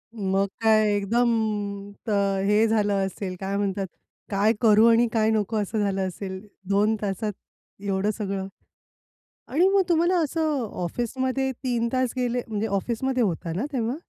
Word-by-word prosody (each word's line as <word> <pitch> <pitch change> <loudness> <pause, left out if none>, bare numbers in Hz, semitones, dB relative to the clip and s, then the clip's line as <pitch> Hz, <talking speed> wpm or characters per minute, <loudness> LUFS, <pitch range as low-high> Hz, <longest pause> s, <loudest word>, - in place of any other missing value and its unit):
मग 195 -1 0
काय 215 -1 +4
एकदम 235 +4 +2 0.8
तर 200 -2 +1
हे 210 +2 +4
झालं 210 -2 +2
असेल, 190 -1 -5
काय 195 +1 -3
म्हणतात, 195 -1 -1 0.4
काय 205 +2 +3
करू 220 0 +6
आणि 230 +1 +4
काय 220 -1 +3
नको 220 0 0
असं 215 +2 -2
झालं 195 -2 0
असेल, 190 +1 -6 0.3
2 210 +2 +3
तासात 205 +1 -2 0.5
एवढं 200 +1 0
सगळं? 195 -2 -3 1.0
आणि 345 +7 +3
मग 395 0 +4
तुम्हाला 345 +2 +3
असं 305 -3 0 0.2
ऑफिसमध्ये 260 +7 -1
3 240 -2 -1
तास 255 -2 +1
गेले, 245 0 0
म्हणजे 220 0 -2
ऑफिसमध्ये 235 +5 0
होता 170 -3 -2
ना 215 - -1
तेव्हा? 240 +1 -1
215 Hz, 145 wpm, -25 LUFS, 200-240 Hz, 1.0 s, करू